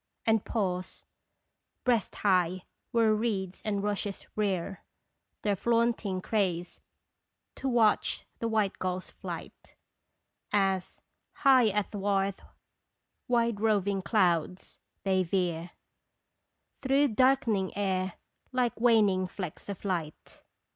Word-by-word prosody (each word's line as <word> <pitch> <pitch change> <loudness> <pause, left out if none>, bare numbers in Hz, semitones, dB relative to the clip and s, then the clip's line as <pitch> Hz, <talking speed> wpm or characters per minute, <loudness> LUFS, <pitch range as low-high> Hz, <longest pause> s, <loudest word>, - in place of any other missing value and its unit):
And 220 -2 +3
pause, 185 -5 -3 0.8
breast 235 -6 +1
high, 185 -2 +2 0.3
where 225 -2 +3
reeds 205 -4 -2
and 205 -2 -1
rushes 205 -1 -3
rear 195 -3 -1 0.6
Their 205 -1 +2
flaunting 230 -3 +1
craze, 180 -5 -1 0.8
to 270 - -2
watch 230 -4 +2
the 230 - -1
white 215 -3 0
gulls' 185 0 -3
flight, - - -9 0.8
As, 195 -2 0 0.3
high 260 -4 +5
athwart 200 -1 0 0.9
wide 235 -3 +1
roving 200 -3 +2
clouds, 180 -2 0 0.2
they 190 -1 +2
veer 175 -2 -1 1.1
Through 275 +1 +3
darkening 230 -5 +2
air, 190 -2 0 0.4
like 250 -3 0
waning 210 -6 +4
flecks 180 -1 -7
of 200 0 -6
light. 170 -6 -4
200 Hz, 100 wpm, -29 LUFS, 185-225 Hz, 1.1 s, high